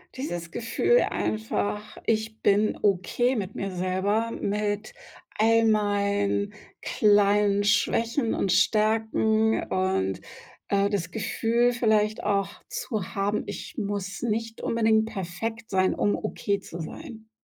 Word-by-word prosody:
Dieses 175 - -4
Gefühl 235 - +2
einfach: 215 -1 -2
„Ich 220 0 -1
bin 205 +1 +2
okay 210 +6 +1
mit 200 -2 -3
mir 195 - -3
selber, 190 +5 0
mit 210 +1 -2 0.4
all 225 +1 +4
meinen 205 -1 +1 0.3
kleinen 205 -1 +3
Schwächen 230 +4 +1
und 190 - 0
Stärken“ 220 +1 +2
und, 185 - 0 0.5
äh, 200 0 +2
das 180 -4 -2
Gefühl 230 +2 +1
vielleicht 215 -2 +1
auch 200 -1 +1 0.2
zu 255 - -4
haben: 200 +1 0
„Ich - - -7
muss 200 -1 -3
nicht 230 0 -2
unbedingt 220 -1 +2
perfekt 220 +2 -5
sein, 185 -1 +2
um 205 - +1
okay 200 -1 -2
zu 170 -3 -9
sein.“ 220 - -9
210 Hz, 115 wpm, -26 LUFS, 200-225 Hz, 0.5 s, all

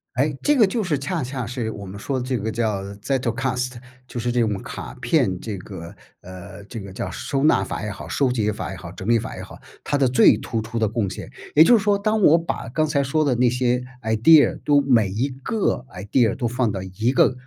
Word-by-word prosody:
哎， 140 +3 +1
这 295 -1 +3
个 220 -5 +6
就 220 +3 -1
是 155 -7 -1
恰 150 +3 -2
恰 125 -1 -4
是 115 -1 -3
我 100 - -8
们 95 +1 -8
说 130 +6 -2
的 125 - -4
这 130 -1 0
个 110 +1 -3
叫 110 -4 -1
Zettelkasten 125 +2 -2 0.3
就 120 - -5
是 120 +1 -2
这 120 0 +1
种 105 -4 -1
卡 - - -7
片 90 -2 +1
这 105 -1 -5
个， 90 -3 -9 0.2
呃， 95 +2 -11
这 115 +1 -7
个 100 0 -9
叫 95 0 -4
收 135 - -2
纳 155 - +4
法 - - -5
也 105 - -4
好， 100 - -8
收 135 -2 +1
集 110 -4 0
法 105 - -5
也 - - -6
好， 85 -2 -9
整 95 +2 -8
理 115 0 +4
法 - - -6
也 - - -6
好， - - -11 0.3
它 145 - 0
的 135 -3 +3
最 125 - +6
突 115 - -3
出 110 +2 -6
的 110 -2 +1
贡 110 -2 -1
献。 - - -8 0.2
也 155 - +9
就 240 +7 +6
是 - - -1
说 205 0 +2
当 215 +2 0
我 165 -3 +6
把 165 -6 -4
刚 155 +7 0
才 150 -2 +1
说 140 +3 +1
的 140 -4 +1
那 125 +1 +3
些 125 0 0 0.2
idea 115 +8 +5
都 145 -1 +4
每 120 -7 +3
一 110 +9 -1
个 135 - -2
idea 105 +6 +1
都 125 - -3
放 120 0 0
到 95 - -4
一 110 +7 -1
个 130 - +4
125 Hz, 315 characters per minute, -22 LUFS, 105-140 Hz, 0.3 s, 也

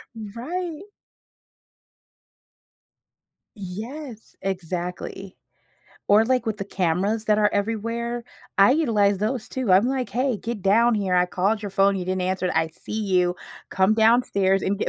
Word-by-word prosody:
Right. 300 - -5 2.7
Yes, 220 +6 -8
exactly. 180 0 -5 0.7
Or, 210 +2 +6
like, 250 0 0
with 215 -1 -2
the 200 - -3
cameras 195 +4 -1
that 210 0 +3
are 210 - +4
everywhere? 230 +3 -2 0.3
I 200 +4 +7
utilize 215 -10 +2
those 220 +3 -2
too, 255 -7 -1
I'm 195 +5 +5
like, 260 -1 -2
"Hey, 255 -1 0
get 230 0 -5
down 225 +5 +4
here, 195 -3 0
I 180 0 +4
called 200 +4 0
your 205 - -4
phone, 195 0 +3
you 185 - -3
didn't 185 0 -2
answer 185 0 -1
it, - - -1
I 160 0 +2
see 160 - -11
you, 180 -2 +2 0.4
come 190 +3 +3
downstairs 220 -4 +3
and 200 +1 -1
get" - - -1
205 Hz, 145 wpm, -24 LUFS, 190-235 Hz, 2.7 s, I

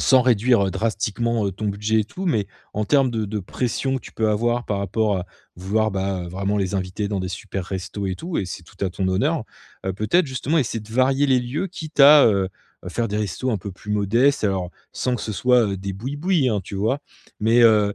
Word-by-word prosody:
sans 130 -1 +5
réduire, 120 -2 +3
heu, 95 - -1
drastiquement, 110 +1 -1
heu, - - 0
ton 105 +4 -4
budget 105 +2 +1
et - - -1
tout. 185 - -6
Mais 110 - +1 0.3
en 105 0 0
termes 135 -1 +3
de 110 -2 -1
de 105 +2 -3
pression 130 +7 -2
que - - -4
tu - - -12
peux 110 -1 0
avoir 120 +3 0
par 100 - -1
rapport, 100 -1 0 0.3
vouloir, 105 +4 0
bah, 95 -1 -2
heu, - - -7
vraiment 95 +3 -1
les 95 0 -1
inviter 95 +2 -3
dans 100 - -2
des 95 - -3
supers 95 0 -5
restos 95 +2 -4
et 95 - -1
tout 170 - -4
et 95 - 0
c'est 90 - -7
tout 85 - -13
à - - +1
ton 95 +1 -1
honneur. 135 - +1 0.4
Heu, 95 - 0
peut-être, 155 - +2
justement, 135 +4 0
essayer 115 -4 -1
de 105 +1 -12
varier 135 +3 +3
les 130 -2 +3
lieux, 135 +10 -3
quitte 160 -4 -9
à, 145 +1 +9
heu, 100 -4 +2 0.4
faire 115 -1 -1
des 105 - -2
restos 105 +5 -2
un 110 - 0
peu 100 +1 -7
plus 105 +3 -10
modestes, 115 +6 +2
alors, 95 -3 0 0.2
sans 125 -1 -1
que - - -7
ce 110 - -3
soit, 115 -1 +3
des 95 +1 -5
bouis-bouis 145 - 0
hein, 105 -3 0
tu 100 - -7
vois? 110 +8 0 0.4
Mais, 115 +3 +3
heu, 105 -3 +5
110 Hz, 230 wpm, -22 LUFS, 100-130 Hz, 0.4 s, à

